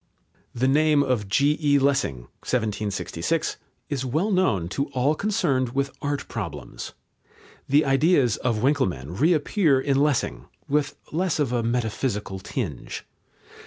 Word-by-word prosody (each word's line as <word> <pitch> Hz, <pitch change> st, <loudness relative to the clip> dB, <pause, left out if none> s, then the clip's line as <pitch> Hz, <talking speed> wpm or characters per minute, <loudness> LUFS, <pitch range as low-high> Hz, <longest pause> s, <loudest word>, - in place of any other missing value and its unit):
The 125 Hz, +2 st, +1 dB
name 150 Hz, +1 st, +4 dB
of 125 Hz, -7 st, 0 dB
G.E. 145 Hz, +4 st, +3 dB
Lessing 140 Hz, -, +1 dB, 0.2 s
(1766) 110 Hz, -, -1 dB, 0.3 s
is 135 Hz, -3 st, -2 dB
well 155 Hz, -, 0 dB
known 110 Hz, -, +2 dB
to 140 Hz, +8 st, -2 dB
all 130 Hz, +4 st, +2 dB
concerned 150 Hz, -, 0 dB
with 140 Hz, 0 st, 0 dB
art 145 Hz, 0 st, -2 dB
problems. 85 Hz, -, -6 dB, 0.8 s
The 145 Hz, +3 st, +4 dB
ideas 135 Hz, -, +3 dB
of 115 Hz, -3 st, -1 dB
Winckelmann 95 Hz, -, 0 dB
reappear 155 Hz, -1 st, +3 dB
in 135 Hz, 0 st, +1 dB
Lessing, 140 Hz, -, 0 dB, 0.2 s
with 145 Hz, 0 st, 0 dB, 0.2 s
less 180 Hz, +2 st, 0 dB
of 140 Hz, -5 st, 0 dB
a 120 Hz, -, +1 dB
metaphysical 110 Hz, -4 st, -2 dB
tinge. 95 Hz, -, -5 dB
135 Hz, 125 wpm, -25 LUFS, 110-150 Hz, 0.8 s, name